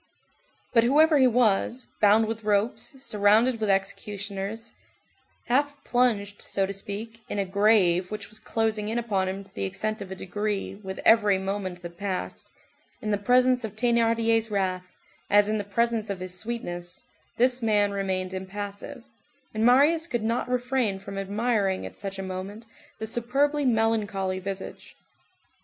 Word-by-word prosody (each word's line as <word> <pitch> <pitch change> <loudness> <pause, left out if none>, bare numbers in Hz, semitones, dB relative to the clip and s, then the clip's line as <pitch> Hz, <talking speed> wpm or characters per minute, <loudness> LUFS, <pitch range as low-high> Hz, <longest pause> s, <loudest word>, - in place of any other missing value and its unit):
But 230 -2 +5
whoever 300 +4 +5
he 260 - +6
was, 240 +1 +2 0.2
bound 215 +2 +5
with 225 0 -4
ropes, 215 +6 -1
surrounded 220 +3 +3
with 215 - 0
executioners, 200 +2 -3 0.7
half 285 +4 +1
plunged, 215 -5 +1
so 195 - -1
to 195 - -4
speak, 210 +4 -7
in - - -3
a 200 - 0
grave 190 -3 +3
which 210 -1 -6
was 215 +1 -8
closing 220 -2 -1
in 225 - -1
upon 205 -5 0
him 195 +1 -5
to 195 - -23
the 100 - -4
extent 215 - -3
of 195 - -7
a 190 - -5
degree 205 +2 -3
with 190 -1 -8
every 210 -3 +5
moment 190 -2 -4
that 170 0 -9
passed, 195 -2 -4 0.5
in 215 - -3
the 205 - +2
presence 250 +3 +3
of 215 -2 -5
Thénardier's 230 -1 +2
wrath, 185 -3 -2 0.3
as 205 0 +5
in 215 0 0
the - - -2
presence 225 +1 0
of 195 -2 -3
his 185 0 -6
sweetness, 180 -5 -5 0.3
this 250 +1 +3
man 210 -2 +2
remained 190 -2 -2
impassive; 200 +6 -6 0.5
and 215 0 -1
Marius 290 +7 +4
could 240 -8 -2
not 230 +3 -1
refrain 245 -4 0
from 195 0 -7
admiring 200 -1 0
at - - -9
such 195 -1 -5
a 195 - -4
moment 190 +4 -6 0.3
the 220 - -4
superbly 275 +6 0
melancholy 210 -5 0
visage. 195 0 -7
210 Hz, 155 wpm, -26 LUFS, 195-235 Hz, 0.7 s, he